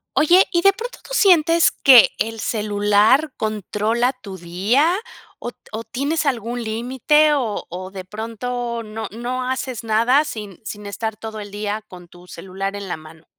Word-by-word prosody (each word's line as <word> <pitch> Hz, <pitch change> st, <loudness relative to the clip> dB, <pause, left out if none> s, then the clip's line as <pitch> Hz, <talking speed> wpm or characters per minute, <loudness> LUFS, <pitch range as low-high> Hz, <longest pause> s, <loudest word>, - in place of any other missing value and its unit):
Oye, 350 Hz, +5 st, +6 dB
¿y 345 Hz, -, +2 dB
de 395 Hz, +2 st, +5 dB
pronto 475 Hz, +4 st, -7 dB
tú -, -, -14 dB
sientes 335 Hz, -6 st, +4 dB
que 255 Hz, -5 st, +7 dB
el 225 Hz, -1 st, -2 dB
celular 210 Hz, +6 st, +2 dB
controla 215 Hz, +3 st, -1 dB
tu 215 Hz, -7 st, -11 dB
día 210 Hz, -, +1 dB, 0.4 s
o 240 Hz, -, -5 dB
t -, -, -38 dB
o 220 Hz, +1 st, -5 dB
tienes 295 Hz, +5 st, -2 dB
algún 240 Hz, -2 st, -2 dB
límite 260 Hz, +7 st, +2 dB
o 240 Hz, -7 st, -2 dB
o 185 Hz, +2 st, -7 dB
de 190 Hz, -2 st, -7 dB
pronto 230 Hz, +4 st, -4 dB
no 220 Hz, 0 st, -6 dB
no 250 Hz, +3 st, -4 dB
haces 260 Hz, -3 st, -4 dB
nada 235 Hz, +7 st, +3 dB
sin 210 Hz, -, -7 dB
sin 210 Hz, -1 st, -7 dB
estar 215 Hz, +2 st, -4 dB
todo 220 Hz, 0 st, -7 dB
el 205 Hz, -1 st, -8 dB
día 210 Hz, +1 st, -4 dB
con 180 Hz, -2 st, -13 dB
tu 175 Hz, +1 st, -17 dB
celular 195 Hz, +3 st, -5 dB
en 200 Hz, -2 st, -7 dB
la -, -, -3 dB
mano? 160 Hz, +1 st, -15 dB
225 Hz, 170 wpm, -20 LUFS, 205-260 Hz, 0.4 s, que